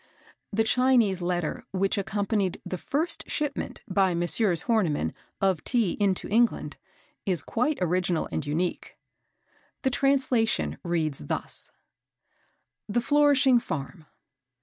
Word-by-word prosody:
The 225 Hz, +1 st, +2 dB
Chinese 230 Hz, -5 st, +3 dB
letter 175 Hz, -2 st, -2 dB
which 195 Hz, +1 st, 0 dB
accompanied 200 Hz, -1 st, -1 dB
the 185 Hz, -, -4 dB
first 320 Hz, +4 st, -1 dB
shipment, 295 Hz, -1 st, -3 dB
by 190 Hz, -2 st, +2 dB
Messrs. 175 Hz, +1 st, +2 dB
Horniman, 170 Hz, -, +1 dB, 0.3 s
of 190 Hz, -5 st, +1 dB
Tea 230 Hz, -8 st, +1 dB
into 195 Hz, -3 st, +1 dB
England, 235 Hz, +2 st, +1 dB, 0.5 s
is 180 Hz, -5 st, +1 dB
quite 265 Hz, +6 st, 0 dB
original 180 Hz, -1 st, +1 dB
and 155 Hz, -, -2 dB
unique." 160 Hz, +5 st, -3 dB, 0.9 s
The 265 Hz, -, +2 dB
translation 245 Hz, -, +1 dB
reads 155 Hz, -, -1 dB
thus: -, -, -4 dB, 1.2 s
"The 215 Hz, -, +1 dB
Flourishing 285 Hz, -2 st, +4 dB
Farm. 155 Hz, -3 st, -6 dB
195 Hz, 110 wpm, -27 LUFS, 175-240 Hz, 1.2 s, Flourishing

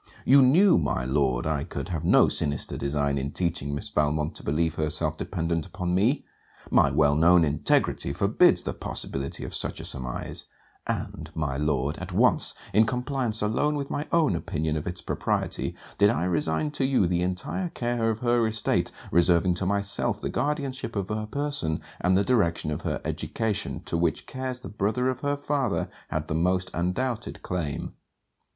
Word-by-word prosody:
You 140 Hz, +2 st, +7 dB
knew, 170 Hz, -, +6 dB
my 70 Hz, -4 st, -1 dB
Lord, 65 Hz, -2 st, +1 dB
I 75 Hz, -2 st, 0 dB
could 70 Hz, -1 st, -6 dB
have 80 Hz, -4 st, -3 dB
no -, -, +5 dB
sinister 70 Hz, 0 st, -1 dB
design 70 Hz, 0 st, 0 dB
in 70 Hz, +2 st, -4 dB
teaching 85 Hz, -5 st, -1 dB
Miss 75 Hz, -, -4 dB
Valmont 75 Hz, +1 st, 0 dB
to -, -, -8 dB
believe 80 Hz, +2 st, 0 dB
herself 75 Hz, -1 st, -1 dB
dependent 85 Hz, -1 st, -2 dB
upon 90 Hz, -3 st, -3 dB
me. 110 Hz, +10 st, +2 dB, 0.5 s
My -, -, +5 dB
well 75 Hz, -2 st, +3 dB
known 85 Hz, +2 st, +5 dB
integrity 75 Hz, -1 st, +1 dB
forbids -, -, +3 dB
the -, -, -3 dB
possibility 70 Hz, 0 st, -4 dB
of -, -, -7 dB
such -, -, -2 dB
a -, -, -6 dB
surmise: 60 Hz, -2 st, -3 dB, 0.4 s
and, 80 Hz, -, -4 dB
my 75 Hz, -4 st, -1 dB
Lord, 75 Hz, -1 st, -1 dB
at -, -, -6 dB
once, -, -, +4 dB, 0.2 s
in 110 Hz, +2 st, +5 dB
compliance 125 Hz, -3 st, -1 dB
alone 145 Hz, +8 st, +1 dB
with 140 Hz, -1 st, -4 dB
my 145 Hz, -, -2 dB
own 160 Hz, -, +3 dB
opinion 80 Hz, -1 st, -2 dB
of 75 Hz, -, -4 dB
its 90 Hz, 0 st, -4 dB
propriety -, -, -2 dB, 0.2 s
did 100 Hz, -, +6 dB
I 80 Hz, -, 0 dB
resign 85 Hz, -, 0 dB
to 145 Hz, -2 st, -2 dB
you 130 Hz, -7 st, +3 dB
the 85 Hz, 0 st, 0 dB
entire 90 Hz, -, -2 dB
care 120 Hz, -5 st, -1 dB
of 110 Hz, 0 st, -2 dB
her 120 Hz, -2 st, +3 dB
estate, 110 Hz, 0 st, 0 dB, 0.2 s
reserving 85 Hz, +1 st, +4 dB
to 90 Hz, +1 st, -2 dB
myself 100 Hz, +2 st, 0 dB
the -, -, -3 dB
guardianship 140 Hz, -4 st, -2 dB
of 100 Hz, -2 st, -2 dB
her 110 Hz, 0 st, -2 dB
person 140 Hz, -, -2 dB, 0.2 s
and 95 Hz, +1 st, +3 dB
the 100 Hz, -, +3 dB
direction 85 Hz, -10 st, +1 dB
of 75 Hz, -, -3 dB
her -, -, -2 dB
education, 110 Hz, -2 st, -2 dB
to 85 Hz, -, -1 dB
which 85 Hz, -3 st, 0 dB
cares 130 Hz, -1 st, -5 dB
the -, -, -7 dB
brother 110 Hz, +5 st, 0 dB
of 130 Hz, -, -6 dB
her 145 Hz, +1 st, -1 dB
father 140 Hz, -5 st, -1 dB, 0.2 s
had 75 Hz, 0 st, -3 dB
the -, -, -2 dB
most 90 Hz, +3 st, +1 dB
undoubted 110 Hz, +8 st, -2 dB
claim. 80 Hz, -6 st, -3 dB
90 Hz, 175 wpm, -26 LUFS, 75-120 Hz, 0.5 s, You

